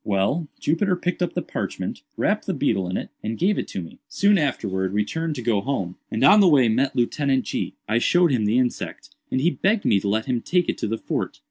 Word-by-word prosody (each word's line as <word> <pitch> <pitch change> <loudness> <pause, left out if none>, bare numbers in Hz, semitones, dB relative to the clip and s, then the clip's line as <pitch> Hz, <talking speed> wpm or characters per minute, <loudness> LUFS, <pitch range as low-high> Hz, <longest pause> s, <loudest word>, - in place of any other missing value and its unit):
"Well, 105 - 0
Jupiter 180 +5 +1
picked 180 0 -3
up 180 - 0
the - - -1
parchment, - - -4 0.2
wrapped 210 +1 0
the 190 - -1
beetle 110 -10 0
in 90 - -2
it, - - -5
and 110 +1 -4
gave 195 +4 +1
it - - -4
to 95 - -5
me. 80 - -12
Soon 200 -1 +3
afterwards 95 -10 -1
we 105 0 +2
turned 160 +4 -3
to 125 - -6
go 110 -4 +1
home, 100 -9 -3
and 110 +3 -1
on 200 +10 +8
the 200 - +6
way 135 -8 +5
met 130 +5 +1
Lieutenant 130 +2 +1
G——. - - -3
I 110 +2 +2
showed 175 +5 +3
him 115 -5 +1
the 110 +4 +2
insect, 125 -1 -2 0.2
and 130 - 0
he 165 +6 +2
begged 205 +3 0
me 100 - +4
to 100 - -2
let 110 +2 0
him 125 -3 -1
take 180 -1 +1
it - - -1
to - - -1
the 115 +2 -2
fort. - - -3
130 Hz, 245 wpm, -23 LUFS, 110-175 Hz, 0.2 s, on